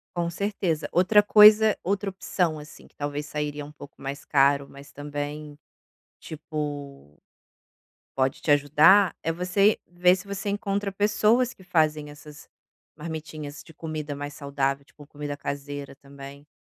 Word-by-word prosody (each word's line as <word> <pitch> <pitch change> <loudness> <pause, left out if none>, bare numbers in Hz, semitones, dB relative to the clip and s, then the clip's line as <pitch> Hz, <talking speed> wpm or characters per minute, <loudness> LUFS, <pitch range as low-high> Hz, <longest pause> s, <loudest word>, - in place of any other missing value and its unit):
Com 170 -1 -1
certeza. 175 -3 -2
Outra 185 +4 +5
coisa 210 +1 +7
outra 200 +2 -1
opção, 180 -4 -2
assim, 150 0 -13
que - - -30
talvez 145 0 -4
sairia 150 -1 -4
um 145 - -12
pouco 145 -1 -13
mais 135 +1 -6
caro, 140 0 +3
mas 140 0 -14
também, 145 +1 -6 0.6
tipo, 145 - -7 1.0
pode 130 0 0
te - - -2
ajudar, 150 +7 +5
é 165 - -1
você 180 +5 +2
ver 180 +1 +3
se 190 +2 -10
você 200 +1 -5
encontra 200 -1 -2
pessoas 215 +5 +2
que - - -19
fazem 155 -4 0
essas 145 0 -14 0.5
marmitinhas 155 -2 -7
de 160 +2 -17
comida 155 -2 -5
mais 145 0 -6
saudável, 140 -1 -2
tipo, 145 +1 -17
comida 145 -1 -6
caseira 140 0 -6
também. 140 +1 -12
150 Hz, 140 wpm, -25 LUFS, 145-185 Hz, 1.0 s, coisa